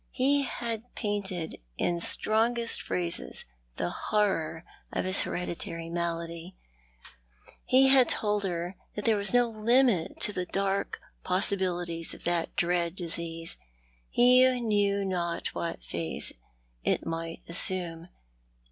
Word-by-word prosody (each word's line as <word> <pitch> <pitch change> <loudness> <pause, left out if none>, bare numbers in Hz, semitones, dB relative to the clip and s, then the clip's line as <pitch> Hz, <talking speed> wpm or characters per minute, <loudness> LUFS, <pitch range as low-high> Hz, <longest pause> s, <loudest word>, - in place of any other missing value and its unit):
He 280 +2 +2
had 235 -3 -4
painted 195 -6 -3 0.2
in 175 -1 0
strongest 230 +6 +3
phrases 175 -1 -2 0.3
the 85 - -1
horror 180 -6 0 0.3
of - - -2
his 185 +1 +4
Bereditary 165 -1 -4
malady. 170 +1 -4 1.1
He 265 +1 +6
had 265 -3 +6
told 210 -1 +2
her 175 0 -3 0.2
that 210 - -4
there 225 - +4
was 200 -1 +1
no 245 -1 +4
limit 230 -3 +2
to 210 - +2
the 180 -1 -3
dark 195 +1 -1 0.2
possibilities 180 -3 -1
of - - -14
that 170 -1 -1
dread 175 0 0
disease. 165 -2 -3 0.5
He 255 +1 +5
knew 205 -3 +1
not 175 -3 -2
what 170 - -4
phase 85 -1 -2 0.5
it - - 0
might 165 0 -5
assume. 170 -1 -1
185 Hz, 120 wpm, -29 LUFS, 170-215 Hz, 1.1 s, He